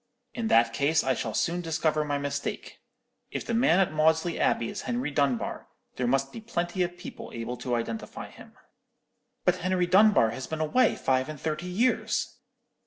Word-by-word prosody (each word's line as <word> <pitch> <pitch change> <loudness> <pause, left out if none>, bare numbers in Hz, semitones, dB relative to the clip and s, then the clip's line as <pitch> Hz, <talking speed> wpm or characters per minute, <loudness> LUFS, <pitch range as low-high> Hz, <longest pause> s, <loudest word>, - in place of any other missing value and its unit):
"'In 230 -2 -2
that 115 - +4
case 145 +5 +2
I 130 - +2
shall 115 -2 -3
soon 175 +1 0
discover 160 -2 0
my 145 -1 -1
mistake. 140 0 -4 0.5
If - - -5
the 235 - -2
man 225 -7 +4
at 190 - +2
Maudesley 160 +2 +2
Abbey 115 - +1
is - - -5
Henry 125 +4 -2
Dunbar, 140 -4 -1 0.3
there 125 - -1
must 135 +2 +1
be 230 - -8
plenty 180 -5 -2
of 175 0 -1
people 180 - -9
able 115 +1 -4
to 125 0 -2
identify 115 -1 -4
him.' - - -14 0.9
"'But 180 0 +3
Henry 180 0 +1
Dunbar 190 - +5
has 130 - -6
been 160 - -4
away 160 +12 +3
five 130 +1 0
and 155 -2 -7
thirty 155 +4 -3
years.' 225 +8 0
155 Hz, 175 wpm, -27 LUFS, 130-180 Hz, 0.9 s, Dunbar